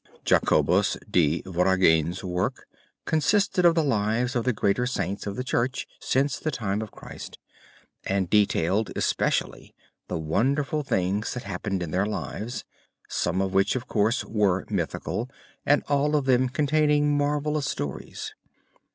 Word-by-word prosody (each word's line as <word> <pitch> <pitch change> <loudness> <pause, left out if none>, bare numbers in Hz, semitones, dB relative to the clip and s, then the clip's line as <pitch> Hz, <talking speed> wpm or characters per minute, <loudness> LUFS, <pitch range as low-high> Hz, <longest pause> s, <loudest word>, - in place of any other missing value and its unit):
Jacobus - - +3
de 80 -2 +2
Voragine's 90 -2 +2
work 90 -1 -2 0.4
consisted 180 +3 +2
of 170 -1 +6
the 165 - +3
lives 120 0 0
of 120 - 0
the 130 - +3
greater 115 +2 +1
Saints 100 -5 -3
of 100 - -3
the 125 - -3
Church 130 0 -1
since 135 +1 0
the 155 - -2
time 105 -7 -2
of 110 - -5
Christ, - - -10 0.7
and 95 -1 0
detailed 100 0 +2
especially - - -1 0.3
the - - -3
wonderful 135 - 0
things 100 -5 -1
that 125 - -5
happened 95 -1 -3
in 80 - -5
their 95 +4 +1
lives, 110 +2 -4 0.4
some 90 +2 0
of 95 0 -3
which 95 +5 +3
of 130 -1 -3
course 110 +1 +1
were 100 -4 +1
mythical 100 +6 -2 0.4
and 145 +1 +4
all 145 +1 +2
of 145 -3 +1
them 130 -1 +3
containing 150 +1 +2
marvelous 145 0 0
stories. 70 -2 -5
110 Hz, 145 wpm, -26 LUFS, 95-140 Hz, 0.7 s, of